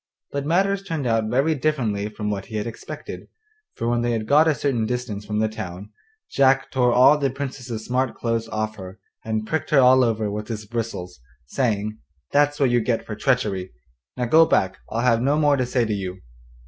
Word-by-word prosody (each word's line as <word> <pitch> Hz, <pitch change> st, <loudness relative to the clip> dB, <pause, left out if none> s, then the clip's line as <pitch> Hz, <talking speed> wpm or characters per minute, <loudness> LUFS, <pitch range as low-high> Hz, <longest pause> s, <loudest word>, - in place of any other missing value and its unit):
But 140 Hz, 0 st, -3 dB
matters 195 Hz, +4 st, +2 dB
turned 165 Hz, -8 st, -4 dB
out 115 Hz, -2 st, +1 dB
very 135 Hz, +7 st, +2 dB
differently 125 Hz, -9 st, -1 dB
from 105 Hz, 0 st, -4 dB
what 100 Hz, -2 st, -4 dB
he 110 Hz, -, -8 dB
had 105 Hz, -1 st, -2 dB
expected, 115 Hz, -, -8 dB, 0.5 s
for 115 Hz, -, -3 dB
when 120 Hz, 0 st, +1 dB
they 120 Hz, 0 st, 0 dB
had 110 Hz, -1 st, -2 dB
got 150 Hz, +7 st, +5 dB
a 155 Hz, -, +3 dB
certain 120 Hz, -7 st, 0 dB
distance 110 Hz, -4 st, -4 dB
from 105 Hz, 0 st, -2 dB
the 110 Hz, +1 st, +2 dB
town 105 Hz, -2 st, -7 dB, 0.4 s
Jack 135 Hz, 0 st, +3 dB
tore 125 Hz, -2 st, +2 dB
all 130 Hz, +5 st, +6 dB
the 140 Hz, -2 st, +1 dB
Princess's 130 Hz, -4 st, -6 dB
smart 130 Hz, 0 st, 0 dB
clothes 115 Hz, -1 st, -2 dB
off 110 Hz, 0 st, -3 dB
her, 95 Hz, 0 st, -9 dB, 0.3 s
and 110 Hz, -1 st, -2 dB
pricked 160 Hz, +7 st, -2 dB
her 150 Hz, -, +5 dB
all 130 Hz, 0 st, +6 dB
over 110 Hz, -3 st, 0 dB
with 105 Hz, +1 st, -5 dB
his 110 Hz, -2 st, -5 dB
bristles, 105 Hz, -, -5 dB, 0.3 s
saying: 110 Hz, -, -1 dB, 0.3 s
'That's 145 Hz, 0 st, +2 dB
what 135 Hz, -3 st, +3 dB
you 120 Hz, -, +4 dB
get 115 Hz, 0 st, -1 dB
for 110 Hz, -, -5 dB
treachery. 105 Hz, -, 0 dB, 0.4 s
Now 125 Hz, -, 0 dB
go 160 Hz, +6 st, +6 dB
back, 95 Hz, -1 st, +1 dB
I'll 115 Hz, -, -1 dB
have 120 Hz, -2 st, +3 dB
no 140 Hz, +4 st, +2 dB
more 145 Hz, -2 st, +4 dB
to 130 Hz, -2 st, -1 dB
say 125 Hz, -1 st, +1 dB
to 110 Hz, -, -1 dB
you. 95 Hz, -2 st, -4 dB
120 Hz, 205 wpm, -23 LUFS, 110-135 Hz, 0.5 s, all